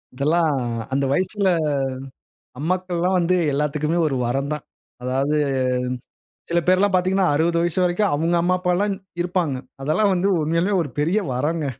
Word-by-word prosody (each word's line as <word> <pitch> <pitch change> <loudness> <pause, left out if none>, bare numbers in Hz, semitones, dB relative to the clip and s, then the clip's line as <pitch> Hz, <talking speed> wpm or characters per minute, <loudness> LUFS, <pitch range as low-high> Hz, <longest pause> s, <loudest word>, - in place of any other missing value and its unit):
இதெல்லாம் 155 +4 +2 0.4
அந்த 140 0 +1
வயசுல 190 +3 +1 1.1
அம்மாக்கள்லாம் 180 +2 0
வந்து 180 +1 +2 0.2
எல்லாத்துக்குமே 150 +3 0
ஒரு 135 -3 -1
வரந்தான். 140 +4 -2 0.4
அதாவது 135 +4 0 1.1
சில 170 0 +1
பேர்லாம் 190 +2 +3
பார்த்தீங்கன்னா, 185 +1 +2
60 170 +2 +2
வயசு 175 +1 0
வரைக்கும் 180 +2 +1
அவுங்க 165 +3 +1
அம்மா, 180 +1 +2
அப்பால்லாம் 185 +3 0 0.3
இருப்பாங்க. 175 -6 -1 0.3
அதெல்லாம் 190 +8 +2
வந்து 185 +2 +1
உண்மையாலுமே 170 +6 +1
ஒரு 145 - -6
பெரிய 170 +8 +2
வரங்க. 150 +4 -1
170 Hz, 125 wpm, -22 LUFS, 150-185 Hz, 1.1 s, பேர்லாம்